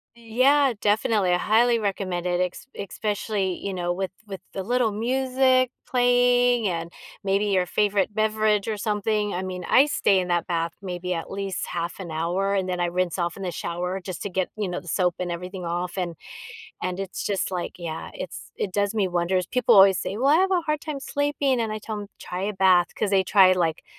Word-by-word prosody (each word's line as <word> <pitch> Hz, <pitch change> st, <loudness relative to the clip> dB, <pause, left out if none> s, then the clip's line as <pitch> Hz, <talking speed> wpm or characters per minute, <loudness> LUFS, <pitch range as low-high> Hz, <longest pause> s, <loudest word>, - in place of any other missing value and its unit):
Yeah, 255 Hz, +4 st, +3 dB
definitely 210 Hz, -2 st, +2 dB
I 180 Hz, -, +4 dB
highly 230 Hz, +4 st, +3 dB
recommend 190 Hz, -4 st, -2 dB
it. 180 Hz, 0 st, 0 dB
Escp -, -, -13 dB, 0.2 s
especially, 205 Hz, -3 st, -2 dB
you 195 Hz, -, -2 dB
know, 175 Hz, -1 st, -1 dB
with 190 Hz, +1 st, -3 dB, 0.2 s
with 195 Hz, -2 st, -7 dB
the 195 Hz, -, -3 dB
little 240 Hz, +2 st, +1 dB
music 255 Hz, +2 st, +2 dB, 0.2 s
playing 245 Hz, -2 st, +3 dB
and 170 Hz, -1 st, -3 dB, 0.3 s
maybe 200 Hz, +1 st, +1 dB
your 190 Hz, -3 st, +2 dB
favorite 205 Hz, +1 st, +1 dB
beverage 215 Hz, -1 st, +1 dB
or 220 Hz, -, -1 dB
something. 210 Hz, 0 st, -1 dB
I 180 Hz, -, -2 dB
mean, 185 Hz, -1 st, -5 dB
I 270 Hz, -, +6 dB
stay 200 Hz, -9 st, +2 dB
in 180 Hz, -, -2 dB
that 175 Hz, -1 st, 0 dB
bath 170 Hz, -2 st, -1 dB
maybe 180 Hz, -1 st, -3 dB
at 165 Hz, -, -5 dB
least 195 Hz, -1 st, -3 dB
half 170 Hz, 0 st, -4 dB
an 170 Hz, -, -7 dB
hour, 175 Hz, +5 st, -1 dB
and 190 Hz, -1 st, 0 dB
then 180 Hz, -1 st, -2 dB
I -, -, +2 dB
rinse 180 Hz, 0 st, -1 dB
off 175 Hz, +1 st, -2 dB
in 195 Hz, -, -7 dB
the 180 Hz, -, -2 dB
shower 180 Hz, +3 st, -3 dB
just 180 Hz, -2 st, -7 dB
to 200 Hz, -, -3 dB
get, 185 Hz, 0 st, -1 dB
you 205 Hz, -3 st, -1 dB
know, 180 Hz, -, -4 dB
the 175 Hz, -, -17 dB
soap 180 Hz, -1 st, +1 dB
and 180 Hz, -1 st, -3 dB
everything 180 Hz, +2 st, -6 dB
off 175 Hz, +2 st, -3 dB
and 175 Hz, -3 st, -2 dB, 0.7 s
and 185 Hz, 0 st, -2 dB
it's 195 Hz, -1 st, -5 dB
just 195 Hz, -1 st, -1 dB
like, 175 Hz, -1 st, -4 dB
yeah, 165 Hz, -2 st, -5 dB
it's -, -, -8 dB
it 190 Hz, -, -3 dB
does 200 Hz, +1 st, +1 dB
me 210 Hz, -4 st, +1 dB
wonders. 180 Hz, +1 st, 0 dB
People 250 Hz, -5 st, +3 dB
always 195 Hz, -2 st, +7 dB
say, 200 Hz, -, -4 dB
"Well, 260 Hz, +4 st, 0 dB
I 295 Hz, -, +6 dB
have 380 Hz, +1 st, +2 dB
a 360 Hz, -3 st, +2 dB
hard 305 Hz, -1 st, -1 dB
time 305 Hz, -3 st, -5 dB
sleeping," 280 Hz, -2 st, 0 dB
and 225 Hz, -1 st, -1 dB
I 215 Hz, -, -3 dB
tell 215 Hz, 0 st, -5 dB
'em, 205 Hz, -, -7 dB
"Try 180 Hz, +1 st, -5 dB
a 210 Hz, +2 st, -1 dB
bath," 185 Hz, -3 st, +4 dB
'cause 205 Hz, -, 0 dB
they 195 Hz, -1 st, +4 dB
try 190 Hz, -1 st, +6 dB
like 165 Hz, -3 st, 0 dB
195 Hz, 215 wpm, -24 LUFS, 180-220 Hz, 0.7 s, always